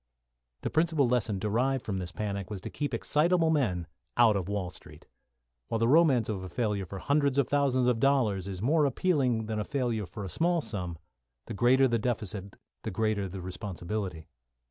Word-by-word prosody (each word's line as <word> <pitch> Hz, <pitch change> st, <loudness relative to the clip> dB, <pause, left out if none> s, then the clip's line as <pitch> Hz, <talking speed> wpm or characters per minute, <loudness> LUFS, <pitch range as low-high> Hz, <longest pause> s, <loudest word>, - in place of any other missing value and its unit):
The -, -, -2 dB
principal 160 Hz, -4 st, +2 dB
lesson 120 Hz, -4 st, +1 dB
derived 120 Hz, +6 st, 0 dB
from 95 Hz, -3 st, -2 dB
this 90 Hz, -2 st, -5 dB
panic 100 Hz, +1 st, -4 dB
was 105 Hz, -2 st, -5 dB
to -, -, -7 dB
keep 145 Hz, -3 st, -3 dB
excitable 160 Hz, +7 st, +2 dB
men 100 Hz, -, +1 dB, 0.3 s
out 115 Hz, -3 st, +6 dB
of 95 Hz, -1 st, -2 dB
Wall 100 Hz, -3 st, -2 dB
Street. -, -, -13 dB, 0.6 s
While 115 Hz, -, -1 dB
the 115 Hz, +1 st, +2 dB
romance 140 Hz, -5 st, +4 dB
of 105 Hz, -4 st, -3 dB
a 95 Hz, -, -7 dB
failure 105 Hz, -3 st, -1 dB
for 100 Hz, -, -7 dB
hundreds 140 Hz, +5 st, +1 dB
of 140 Hz, -, +3 dB
thousands 135 Hz, -3 st, +2 dB
of 120 Hz, -2 st, +2 dB
dollars 110 Hz, -8 st, +2 dB
is 95 Hz, 0 st, -5 dB
more 150 Hz, +4 st, +3 dB
appealing 135 Hz, -6 st, +1 dB
than 110 Hz, 0 st, -3 dB
a -, -, 0 dB
failure 120 Hz, -6 st, -1 dB
for 100 Hz, +4 st, -7 dB
a -, -, -4 dB
small 170 Hz, -, +1 dB
sum, 90 Hz, -, -4 dB, 0.5 s
the -, -, -6 dB
greater 130 Hz, +6 st, +4 dB
the 120 Hz, -2 st, +1 dB
deficit 105 Hz, -4 st, -3 dB, 0.3 s
the -, -, -4 dB
greater 105 Hz, -1 st, -1 dB
the 95 Hz, +1 st, -7 dB
responsibility. 95 Hz, -2 st, -5 dB
110 Hz, 190 wpm, -29 LUFS, 100-135 Hz, 0.6 s, out